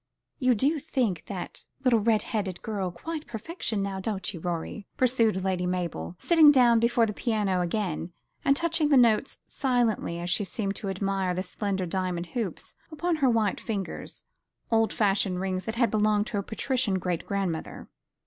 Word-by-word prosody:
You 255 -2 +3
do 290 +8 +2
think 220 - -1
that 185 -4 -6 0.2
little 245 -3 +4
red 215 0 +2
haired 195 -5 -2
girl 200 -4 -2
quite 310 - -6
perfection, 225 - -3
now 195 -1 -3
don't 190 -2 -3
you, 170 - -7
Rorie?" 175 +4 -4
pursued 230 -6 +2
Lady 185 -2 0
Mabel, 170 - -3
sitting 320 -4 +6
down 240 -4 +5
before 235 0 +3
the 210 - -3
piano 205 -5 0
again, 175 -2 -2 0.3
and 275 - +4
touching 330 -2 +1
the 285 - +6
notes 235 +1 +3
silently 240 -10 0
as 175 +1 -3
she 195 - +2
seemed 195 0 -3
to 200 - -4
admire 195 -1 -1
the 185 - -1
slender 195 0 -2
diamond 180 -1 -2
hoops 225 -9 -4 0.2
upon 335 +2 -1
her 275 -4 +3
white 220 -4 +1
fingers 200 -5 -5 0.5
old 225 -2 +3
fashioned 195 -3 +1
rings 185 0 -2
that 225 - -3
had 235 -3 +2
belonged 210 -1 +2
to 210 -3 -2
a - - 0
patrician 225 0 0
great 180 -2 -3
grandmother. 190 -5 -3
205 Hz, 170 wpm, -27 LUFS, 185-240 Hz, 0.5 s, sitting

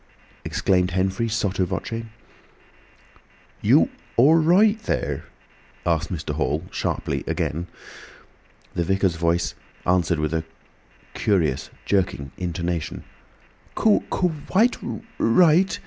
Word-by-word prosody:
exclaimed 90 -2 +1
Henfrey, 95 +5 0
sotto 100 -4 0
voce. 115 +5 -3 1.6
"You—all—right 170 - +4
thur?" 210 - -2 0.6
asked 85 +1 0
Mr. 75 -4 -3
Hall, 75 +1 -1
sharply, - - -2
again. 85 +4 -2 1.1
The 85 - 0
Vicar's 95 0 +1
voice 85 +1 0 0.3
answered 90 -2 +2
with 75 +1 -1
a 80 -1 0 0.7
curious 85 -11 0 0.2
jerking 85 -9 0
intonation: 85 -3 -3 0.7
"Quite 190 +1 +1
ri 115 -3 -5 0.2
right. 170 +9 +4
95 Hz, 85 wpm, -23 LUFS, 85-140 Hz, 1.6 s, You—all—right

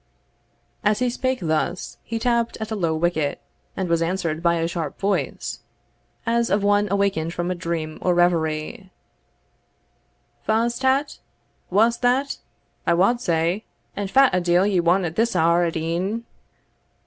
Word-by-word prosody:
As 210 0 +3
he 250 +1 0
spoke 260 +1 -1
thus, 165 +3 -2
he 230 - -4
tapped 235 0 0
at 220 0 -5
a - - -1
low 165 -5 0
wicket, 155 -3 0 0.4
and 190 - -1
was 170 -1 +1
answered 165 -2 -1
by 170 0 +3
a 165 0 0
sharp 165 -4 -4
voice, 200 0 -2 0.7
as 235 0 +1
of 200 +1 +1
one 205 0 +3
awakened 195 -4 0
from 175 +1 -2
a - - +1
dream 165 -3 -4
or 180 -1 +2
reverie, 170 +1 0 1.5
"Fa's 230 +2 +1
tat? 265 +2 +1 0.5
Wha's 225 +5 +3
that, 260 +3 +1 0.5
I 170 - +4
wad 235 +8 +3
say? 170 +3 0 0.3
and 200 -1 -3
fat 265 +1 +5
a 180 - +2
deil 175 +2 +3
want 175 +3 +3
ye - - 0
at 160 - -8
this 230 -2 +1
hour 170 +1 +3
at 165 -1 -2
e'en? 180 +8 -2
185 Hz, 155 wpm, -23 LUFS, 170-225 Hz, 1.5 s, fat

